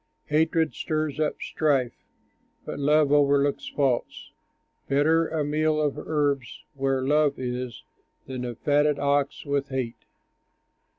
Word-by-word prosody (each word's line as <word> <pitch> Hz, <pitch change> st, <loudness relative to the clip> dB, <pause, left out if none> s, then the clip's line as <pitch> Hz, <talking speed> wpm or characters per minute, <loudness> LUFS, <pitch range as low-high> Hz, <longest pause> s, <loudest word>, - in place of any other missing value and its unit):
Hatred 160 Hz, +1 st, +2 dB
stirs 155 Hz, -2 st, -2 dB
up 155 Hz, -1 st, 0 dB
strife, 135 Hz, -6 st, 0 dB, 0.7 s
But -, -, -5 dB
love 150 Hz, 0 st, +3 dB
overlooks 145 Hz, -1 st, +3 dB
faults. 135 Hz, -4 st, -1 dB, 0.6 s
Better 160 Hz, +4 st, +3 dB
a 155 Hz, -2 st, -2 dB
meal 155 Hz, +1 st, +1 dB
of 150 Hz, -2 st, 0 dB
herbs 145 Hz, -6 st, -2 dB
where 135 Hz, -1 st, 0 dB
love 145 Hz, +1 st, +2 dB
is, 125 Hz, -1 st, -4 dB, 0.4 s
Than 130 Hz, -1 st, -5 dB
a 120 Hz, -1 st, -4 dB
fatted 145 Hz, +3 st, +2 dB
ox 140 Hz, +1 st, 0 dB
with 140 Hz, -1 st, -1 dB
hate. 130 Hz, -3 st, -4 dB
145 Hz, 120 wpm, -26 LUFS, 135-150 Hz, 0.7 s, love